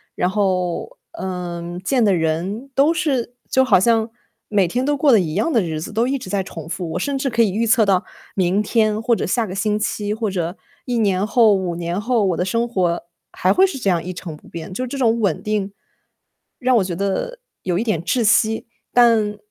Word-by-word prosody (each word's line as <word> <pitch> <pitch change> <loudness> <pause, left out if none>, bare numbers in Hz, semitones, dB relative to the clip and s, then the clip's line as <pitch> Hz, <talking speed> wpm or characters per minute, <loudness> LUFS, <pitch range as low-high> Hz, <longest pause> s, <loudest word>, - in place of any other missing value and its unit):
然 180 - +1
后， 185 -4 -1
嗯， 175 -1 -5
见 245 +6 +1
的 200 -3 +4
人 180 +11 -2
都 280 +5 +4
是 275 -7 -1 0.2
就 260 - +4
好 255 - +4
像 225 +2 +2 0.4
每 200 -4 +2
天 245 +9 -1
都 290 +1 +1
过 280 0 +4
得 225 - +6
一 160 -4 -2
样 225 - 0
的 230 - +4
日 160 -4 -3
子， 160 - -7
都 230 +3 +1
一 275 +1 0
直 250 - -9
在 200 +1 0
重 165 -4 -8
复。 170 0 -4
我 - - -2
甚 280 +8 -1
至 270 - 0
可 230 -1 +3
以 205 - +1
预 230 +4 0
测 220 0 +4
到 190 -2 +2 0.3
明 185 +1 +1
天 215 0 +1
或 230 +1 +2
者 - - -2
下 230 +5 +1
个 185 - -6
星 210 +2 0
期， 210 -1 -2
或 220 -2 -2
者 175 0 -3 0.3
1 245 -2 -1
年 200 -3 +1
后、 220 -1 +5
5 185 -3 -1
年 175 +3 -3
后， 230 -2 +1
我 185 -3 +1
的 180 - 0
生 230 +6 0
活 180 -7 0 0.3
还 185 - +1
会 380 +1 +5
是 370 - -5
这 200 -7 +1
样 170 -2 0
一 180 - -5
成 175 -3 -7
不 150 - -18
变， 170 +2 -8
就 250 +7 -3
是 - - -3
这 275 - -5
种 235 -3 +2
稳 200 -3 0
定， 210 -2 -1 0.9
让 255 -1 +2
我 210 - +3
觉 180 -2 -4
得 200 - -2 0.2
有 180 -2 -1
一 210 - 0
点 215 -9 -1
窒 240 +7 +1
息。 220 +1 +3 0.3
但 225 -4 +4
205 Hz, 240 characters per minute, -20 LUFS, 180-235 Hz, 0.9 s, 得